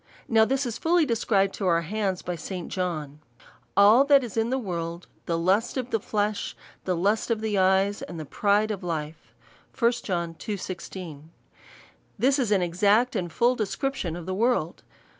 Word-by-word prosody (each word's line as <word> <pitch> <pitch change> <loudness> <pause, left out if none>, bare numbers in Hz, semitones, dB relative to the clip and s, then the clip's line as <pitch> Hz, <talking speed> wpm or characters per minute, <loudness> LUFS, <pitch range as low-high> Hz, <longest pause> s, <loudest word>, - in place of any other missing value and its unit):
Now 220 -1 +5
this 270 +4 0
is 235 -2 -4
fully 335 0 +3
described 205 -5 +1
to 195 - -2
our 170 -1 +3
hands 190 +1 -2
by 180 - -3
St. 180 +2 -6
John. 155 -6 -3 0.6
All 210 +6 +7
that 280 -2 +5
is 235 -5 -7
in 225 0 +1
the 260 - 0
world, 170 -6 -4 0.2
the 170 - 0
lust 195 +10 +1
of 255 -1 -3
the 225 - +1
flesh, 205 0 -2 0.3
the 185 - 0
lust 205 +8 +1
of 230 -2 +1
the 220 -1 -2
cj/es, 190 +1 +2
and 170 - -7
the 155 - -5
pride 205 +7 +1
of 205 -2 -4
life, 160 -2 -5 0.4
&c. 235 - 0
1 235 - +6
John 170 -3 -2
iii. 205 - -1
16. 170 -4 -8 0.9
This 265 +6 +2
is 245 -5 +1
an 200 -3 +3
exact 205 +8 +2
and 175 -4 -2
full 240 +8 +3
description 220 - -2
of 175 -1 -7
the 185 - -3
world. 210 -5 0
200 Hz, 185 wpm, -26 LUFS, 175-230 Hz, 0.9 s, All